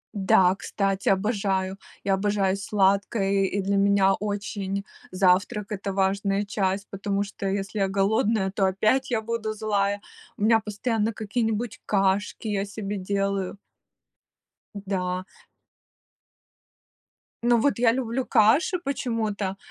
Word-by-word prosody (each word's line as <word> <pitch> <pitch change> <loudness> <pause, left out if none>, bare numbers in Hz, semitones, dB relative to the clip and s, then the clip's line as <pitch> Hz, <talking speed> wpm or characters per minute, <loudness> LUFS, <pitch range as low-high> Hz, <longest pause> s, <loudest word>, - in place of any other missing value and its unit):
Да, 190 -1 +4
кстати, 195 -1 -1
обожаю. 195 -2 0 0.3
Я 195 - +2
обожаю 195 -1 +1
сладкое, 195 0 +1
и 195 +1 0
для 200 +1 0
меня 195 -1 +4
очень 200 -1 -3 0.3
завтрак- 190 +3 +2
это 195 0 -3
важная 195 +1 0
часть, 195 -1 -1
потому 200 0 -2
что, 200 0 -7
если 195 +2 -3
я 195 -1 +1
голодная, 200 +1 +1
то 195 0 0
опять 230 +8 +1
я 220 -2 +1
буду 220 -1 -3
злая. 205 -2 0 0.4
У 205 - -3
меня 225 0 +5
постоянно 220 +1 -1
какие-нибудь 220 +1 -2
кашки 200 +2 0
я 200 -2 0
себе 205 0 -5
делаю 195 0 -2 1.3
Да. 185 -1 -2 2.2
Ну 240 -1 +4
вот 275 -1 +1
я 235 -2 +5
люблю 250 +1 -2
каши 260 - +3
почему-то, 220 - -2
200 Hz, 120 wpm, -25 LUFS, 195-215 Hz, 2.2 s, меня